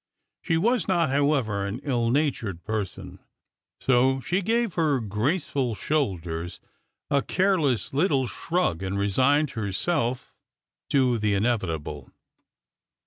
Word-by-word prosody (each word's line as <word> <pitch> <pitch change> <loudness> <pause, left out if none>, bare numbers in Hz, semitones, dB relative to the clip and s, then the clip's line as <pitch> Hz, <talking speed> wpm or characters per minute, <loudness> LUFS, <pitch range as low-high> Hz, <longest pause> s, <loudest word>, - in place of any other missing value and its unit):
She 165 - +1
was 235 +6 +1
not, 170 -6 +2
however, 135 -8 +1
an 100 +4 -3
ill 120 -5 0
natured 120 - -1
person, 105 -4 -4 0.6
so 130 +1 +3
she 180 +8 -1
gave 230 0 0
her 155 -5 +2
graceful 125 - -1
shoulders 90 - -2 0.5
a 140 - +3
careless 165 - +1
little 140 -3 +2
shrug, 160 - -1
and 95 +1 -2
resigned 130 +10 +2
herself 115 - -2 0.6
to 130 -4 +2
the 105 -1 +1
inevitable. 80 - -2
130 Hz, 110 wpm, -26 LUFS, 100-155 Hz, 0.6 s, so